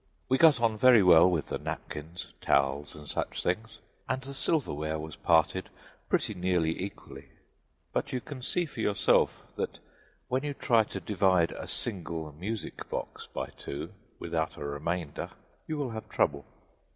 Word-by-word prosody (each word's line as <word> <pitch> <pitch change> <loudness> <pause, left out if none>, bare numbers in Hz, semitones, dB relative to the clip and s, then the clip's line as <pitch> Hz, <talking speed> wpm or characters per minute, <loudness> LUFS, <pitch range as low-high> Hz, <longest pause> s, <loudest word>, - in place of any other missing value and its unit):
We 130 +1 +3
got 160 -6 +7
on 115 -2 +2
very 125 -4 +8
well 90 -1 +8
with 85 -5 -1
the - - -2
napkins, 80 +3 -6
towels 70 +1 +1
and 75 -1 -11
such - - -3
things, 110 +5 -1 0.3
and 130 +1 +1
the 135 +1 -8
silverware 80 - 0
was 80 0 -6
parted 80 -2 +2 0.4
pretty - - +2
nearly 90 -3 +1
equally, 100 +2 -7 0.7
but - - -1
you 130 - 0
can 135 0 -8
see 175 +7 0
for 140 - -10
yourself 105 -2 +3
that - - -2 0.5
when 130 +2 0
you 145 -1 -2
try 115 -5 +3
to - - -5
divide 95 -4 +3
a - - -7
single 85 -7 -3
music 100 +9 -5
box - - -5
by - - -3
two 70 - -6 0.2
without 80 -1 -2
a 75 - -5
remainder 75 +2 -3 0.4
you 155 - -2
will 140 -5 -2
have 110 0 -7
trouble. 70 -1 +1
90 Hz, 160 wpm, -30 LUFS, 80-120 Hz, 0.7 s, very